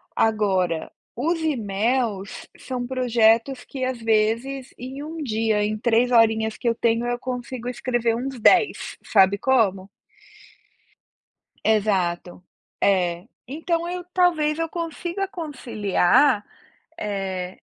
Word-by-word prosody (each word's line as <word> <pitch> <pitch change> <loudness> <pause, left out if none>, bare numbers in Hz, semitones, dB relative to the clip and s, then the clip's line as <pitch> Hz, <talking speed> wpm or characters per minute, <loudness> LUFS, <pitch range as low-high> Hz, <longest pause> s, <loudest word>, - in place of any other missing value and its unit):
Agora, 190 -7 +1 0.2
os 325 +7 -1
e-mails 225 -6 -1
são 250 -2 -5
projetos 245 0 +2
que, 265 -2 -6
às 255 -2 -3
vezes, 230 +5 0
em 265 +3 -7
1 320 +2 -7
dia, 220 -3 0
em 215 0 -2
3 235 +2 +2
horinhas 220 -2 +3
que 240 - -4
eu 230 - +2
tenho, 230 +1 +1
eu 245 0 -2
consigo 250 -1 -5
escrever 240 -2 0
uns 260 +1 -4
10. 365 - +3
Sabe 195 -1 +4
como? 200 -7 +1 1.7
Exato. 185 -5 0 0.4
É. 180 -2 +1 0.2
Então 330 +5 -2
eu 360 0 -4
talvez 320 -4 +2
eu 330 - 0
consiga 345 +3 -4
conciliar, 250 - +1 0.6
eh, 190 -3 -4
235 Hz, 110 wpm, -23 LUFS, 210-270 Hz, 1.7 s, Sabe